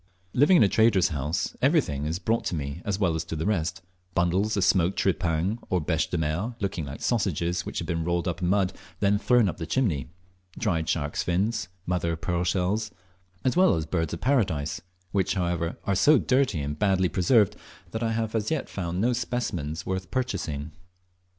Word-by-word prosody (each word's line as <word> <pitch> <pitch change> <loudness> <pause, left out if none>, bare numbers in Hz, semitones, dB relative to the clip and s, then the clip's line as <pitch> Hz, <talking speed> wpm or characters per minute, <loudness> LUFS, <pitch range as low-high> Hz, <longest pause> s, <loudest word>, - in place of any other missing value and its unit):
Living 150 +8 +5
in - - +6
a - - +5
trader's 100 -3 +4
house 75 +1 -2
everything 130 - +2
is 80 +2 -1
brought 110 +5 0
to - - -2
me 70 +2 -4
as 100 -2 -1
well 95 -5 +1
as 80 0 -2
to - - -5
the 80 - -3
rest, 90 -2 -1 0.3
bundles 95 +5 +1
of 100 - +2
smoked 90 0 +3
tripang, 95 +3 0
or 90 - +2
"beche 80 0 0
de 90 - -1
mer," 85 +10 -1
looking 95 -6 -2
like 70 +1 -8
sausages 90 -6 0
which - - -5
have 85 - -3
been 85 -2 -1
rolled 85 +1 0
in 85 0 -1
mud 95 0 +2
and - - -20 0.2
then 100 0 +3
thrown 120 -1 +4
up 90 - -3
the 80 -3 -5
chimney; 80 - 0 0.5
dried 85 -7 0
sharks' 75 -1 -1
fins, 95 +4 0 0.2
mother 90 -2 0
of 80 - -6
pearl 85 +1 -1
shells, 95 +4 0 0.5
as 130 - +1
well 185 0 +5
as 80 - -2
birds 80 -1 -1
of 85 - -4
Paradise, 95 - +1 0.3
which, 95 -1 +1
however, 85 -2 -1
are 100 - +1
so 150 +10 +5
dirty 125 - +1
and 75 +1 -4
so - - -25
badly 95 -3 +3
preserved 100 +4 +3 0.4
that 110 - -4
I 115 -1 0
have 110 -1 -2
as 110 -2 0
yet 160 -3 -2
found 90 -2 -3
no 120 +5 +2
specimens 105 -10 -3
worth 95 -1 -3
purchasing. 80 - -3
90 Hz, 200 wpm, -26 LUFS, 80-110 Hz, 0.5 s, in